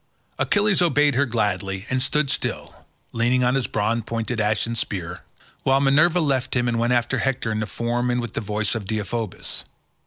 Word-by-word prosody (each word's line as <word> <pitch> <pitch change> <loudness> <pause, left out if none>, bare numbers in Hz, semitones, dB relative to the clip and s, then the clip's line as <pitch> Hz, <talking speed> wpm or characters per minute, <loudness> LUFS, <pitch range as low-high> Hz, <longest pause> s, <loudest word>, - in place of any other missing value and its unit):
Achilles 205 -2 +2
obeyed 150 -4 +3
her 140 +2 +2
gladly, 100 -4 -1
and 130 0 +1
stood 140 +1 +1
still, - - -3 0.4
leaning 120 +2 +2
on 125 0 +3
his 135 -3 0
bronze 115 +2 0
pointed 115 0 -2
ashen 110 +2 0
spear, 90 -6 -4 0.4
while 135 0 +3
Minerva 150 +6 +4
left 135 -7 0
him 120 -1 +1
and 115 -1 0
went 120 +1 +1
after 120 +1 +1
Hector 125 -3 -1
in 110 - -1
the 110 - -2
form 120 +2 -1
and 125 0 +1
with 120 -3 -4
the - - -2
voice 105 0 -1
of 110 -4 -4
Deiphobus. 110 0 -4
120 Hz, 185 wpm, -23 LUFS, 110-135 Hz, 0.4 s, Minerva